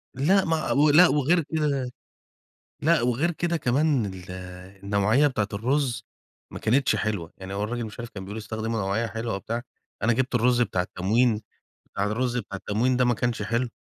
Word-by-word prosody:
لأ، 185 +9 +3
ما 160 -1 0
ولأ، 150 +5 +6
وغير 155 +4 +2
كده 140 -5 -1 0.9
لأ، 165 -2 +3
وغير 125 +8 +1
كده 170 +1 -1
كمان 140 -3 +1
ال 95 -1 -8 0.5
النوعية 105 +8 +3
بتاعة 110 -7 0
الرز 125 +3 0 0.5
ما - - -7
كانتش 130 +5 +2
حلوة، 100 -6 -2
يعني 95 +1 -7
هو 100 +1 -1
الراجل 120 +2 -3
مش 110 - -9
عارف 120 0 -6
كان 95 -2 -8
بيقول 105 +3 -6
استخدموا 110 +1 -3
نوعية 100 +4 0
حلوة 115 0 -4
وبتاع، 115 +5 -4 0.4
أنا 115 - +3
جبت 130 +2 -1
الرز 125 +1 +3
بتاع 95 -5 0
التموين، 105 +5 +1 0.5
بتاع 100 - -3
الرز 120 +4 -1
بتاع 105 -5 -4
التموين 115 +6 0
ده 125 - +3
ما 120 0 +3
كانش 115 -1 -1
حلو. 115 +4 0
120 Hz, 175 wpm, -25 LUFS, 105-140 Hz, 0.9 s, ولأ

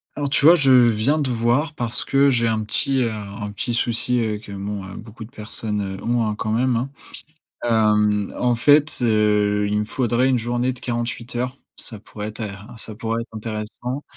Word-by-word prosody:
Alors, 145 -1 -2
tu 140 +1 +2
vois? 170 +3 +9
Je 140 -5 +3
viens 125 +4 +4
te 140 - -1
voir 120 +7 +1
parce 120 -1 -3
que 140 +1 +3
j'ai 115 -2 +1
un 110 -1 0
petit, 135 +5 +1
heu, 115 - -1
un 105 0 -6
petit 110 +4 -3
souci, 120 +1 +1
heu, 110 -2 -1
que, 105 -1 -12
bon, 100 0 -5
heu, 95 - -9
beaucoup 110 +1 -10
de - - -16
personnes 105 -4 -5
ont, 120 -1 0
hein, 105 -1 -1
quand 110 0 -3
même, 125 +2 +1
hein. 125 +4 -1 0.7
Hem, 105 -3 +2
en 125 -1 +2
fait, 145 +5 +5
heu, 105 -2 +2
il 105 0 +1
me 105 - -1
faudrait 125 +1 +1
une 130 - +3
journée 120 +2 -1
de 125 - -15
48 120 -1 -4
heures, 125 +2 -3 0.2
ça 110 -4 -8
pourrait 105 0 -8
être 110 - -9
in 105 +1 -7
ça 110 -1 -5
pourrait 115 +1 -2
être 115 - -9
intéressant. 110 +5 -5
115 Hz, 205 wpm, -22 LUFS, 105-125 Hz, 0.7 s, vois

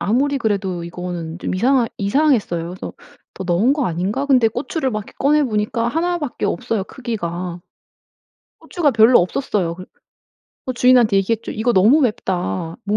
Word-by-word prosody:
아무리 275 +6 +1
그래도 195 -6 -2
이거는 170 -1 -6
좀 - - -3
이상하 245 +4 +2
이상했어요. 200 - +1
그래서 185 - -7 0.4
'더 190 - -6
넣은 185 +9 +2
거 285 -4 0
아닌가?' 190 +11 -2
근데 250 -5 +4
고추를 260 +4 -3
막 215 - -2
이렇게 - - -15
꺼내 295 +2 +3
보니까 225 0 -1
1 345 +5 -1
밖에 290 -9 -4
없어요 205 +2 -1
크기가. 180 -8 -5 1.0
고추가 315 -6 0
별로 225 +2 +6
없었어요. 180 -2 -1
그래 185 +1 -10 0.8
어 255 - -1
주인한테 245 -4 +4
얘기했죠. 220 +3 -1
"이거 230 +3 0
너무 225 +10 +5
맵다. 175 - -2
모 210 +1 0
215 Hz, 355 characters per minute, -19 LUFS, 185-260 Hz, 1.0 s, 별로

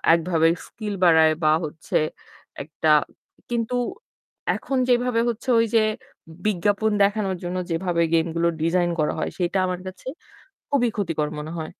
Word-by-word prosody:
একভাবে 165 -1 +2 0.2
স্কিল 215 -3 -6
বাড়ায় 160 -2 +6
বা 155 - +5
হচ্ছে 155 +1 -4 0.7
একটা 155 +2 -3 0.6
কিন্তু 235 0 -1 0.8
এখন 270 - -3
যেভাবে 245 -1 +2
হচ্ছে 235 +2 -4
ওই 230 - +3
যে 225 - +6 0.6
বিজ্ঞাপন 205 +2 +1
দেখানোর 200 -1 +1
জন্য 175 +1 -3
যেভাবে 170 0 0
গেমগুলো 165 +1 +1
ডিজাইন 175 +1 +2
করা 150 - +1
হয় - - -1
সেটা 180 +1 0
আমার 180 -1 -3
কাছে 185 +4 -10 0.6
খুবই 255 -4 +2
ক্ষতিকর 165 -7 -1
মনে 150 +2 -6
হয়। 155 -1 -5
180 Hz, 135 wpm, -23 LUFS, 165-215 Hz, 0.8 s, বাড়ায়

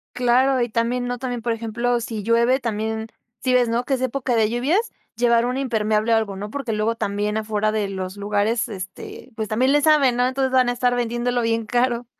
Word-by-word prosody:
Claro, 255 +2 +3
y 240 - +1
también, 240 +2 -1
¿no?, 245 0 -2
también, 245 -2 -4
por 230 +1 -1
ejemplo, 235 +2 -1
si 225 -2 -4
llueve 235 +4 +3
también 220 -2 -3 0.3
Si 255 +2 0
ves, 245 -2 +3
¿no?, 235 +2 0
que 275 - -1
es 260 - -1
época 260 -1 -1
de 220 -2 +3
lluvias, 295 - 0 0.2
llevar 235 0 +3
un 250 +1 -1
impermeable 220 -4 +1
o - - +5
algo, 210 -3 -2
¿no?, 205 +2 -6
porque 275 -4 -3
luego 215 +2 0
también 205 0 -2
afuera 215 -1 0
de 215 -2 -1
los 190 0 -5
lugares 210 +3 0
este, 190 -2 -8
pues, 220 -1 -2
también 250 +6 +2
le 295 +1 +4
saben, 290 -5 +4
¿no?, 245 0 +3
entonces 265 0 -1
van 255 -1 +4
a - - 0
estar 245 0 +1
vendiéndolo 240 +1 -1
bien 230 -1 0
caro. 245 +1 0
235 Hz, 215 wpm, -22 LUFS, 220-250 Hz, 0.3 s, o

